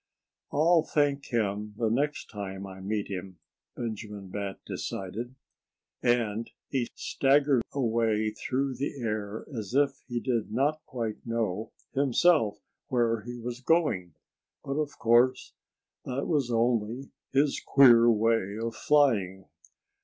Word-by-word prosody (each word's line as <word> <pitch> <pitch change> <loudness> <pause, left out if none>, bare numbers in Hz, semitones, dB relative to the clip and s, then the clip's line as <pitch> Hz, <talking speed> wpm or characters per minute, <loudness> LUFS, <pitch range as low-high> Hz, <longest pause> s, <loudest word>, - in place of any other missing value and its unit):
"I'll 165 +3 +4
thank 145 -2 0
him 105 -2 -1
the 115 -2 +1
next 145 +5 -1
time 100 -2 -6
I 95 -1 -9
meet 105 +2 -2
him," 95 -1 -6 0.4
Benjamin 105 -4 -6
Bat 100 0 -4
decided. 110 +7 -5 0.7
And 115 -2 +1 0.2
he 130 -4 0
staggered 140 -1 +3
away 115 -4 +1
through 130 +3 -2
the 140 +1 -3
air 110 -2 -3
as 110 +1 -5
if 140 -1 +2
he 120 -2 -2
did 115 -4 -1
not 145 +6 +1
quite 115 -4 -4
know, 110 -3 -2 0.2
himself, 140 -3 +3 0.3
where 120 -5 +1
he 120 0 -6
was 120 +1 -6
going. 115 - +1 0.5
But, 140 +1 -3
of 150 -2 -3
course, 120 +2 +3 0.5
that 130 +2 -2
was 145 -7 +1
only 115 +2 0 0.2
his 140 +1 +2
queer 120 -4 +7
way 110 -2 +2
of 115 0 -3
flying. 105 -11 +2
115 Hz, 125 wpm, -28 LUFS, 105-135 Hz, 0.7 s, queer